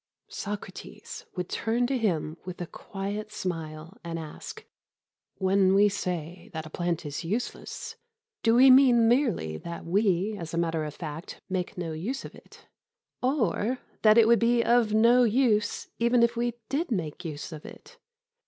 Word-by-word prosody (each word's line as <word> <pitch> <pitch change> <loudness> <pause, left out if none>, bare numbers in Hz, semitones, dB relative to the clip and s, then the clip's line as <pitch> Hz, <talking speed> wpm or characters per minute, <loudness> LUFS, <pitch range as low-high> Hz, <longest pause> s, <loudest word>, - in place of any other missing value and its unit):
Socrates 205 0 -7
would 180 -1 -3
turn 235 +2 0
to 265 +2 0
him 170 -9 -1
with 180 -1 -7
a 175 - -3
quiet 205 +4 -6
smile 165 0 -5
and 165 -1 -4
ask: 155 -2 -8 0.7
"When 190 0 +3
we 205 +1 +6
say 175 -3 -4
that 160 -1 -4
a 155 - -10
plant 175 -1 -2
is 145 +2 -4
useless, 215 +9 -4 0.4
do 230 0 +4
we 260 +2 +8
mean 250 -3 +6
merely 230 - +1
that 170 - -7
we 195 +2 +1
as 165 -1 -5
a - - -2
matter 165 -2 0
of 150 - -6
fact 160 0 -7
make 185 -1 -3
no 170 -2 -3
use 210 +13 -4
of - - -9
it, - - -17 0.6
or 250 - +1 0.2
that 215 0 +6
it 225 -1 +7
would 235 0 +5
be 235 0 +3
of 235 -2 +3
no 230 +3 +5
use 225 -3 +1
even 235 +1 +4
if 235 0 +2
we 240 0 -1
did 285 +5 -1
make 170 - -3
use 155 -1 -6
of 155 -2 -8
it?" 475 - -13
200 Hz, 165 wpm, -27 LUFS, 170-235 Hz, 0.7 s, we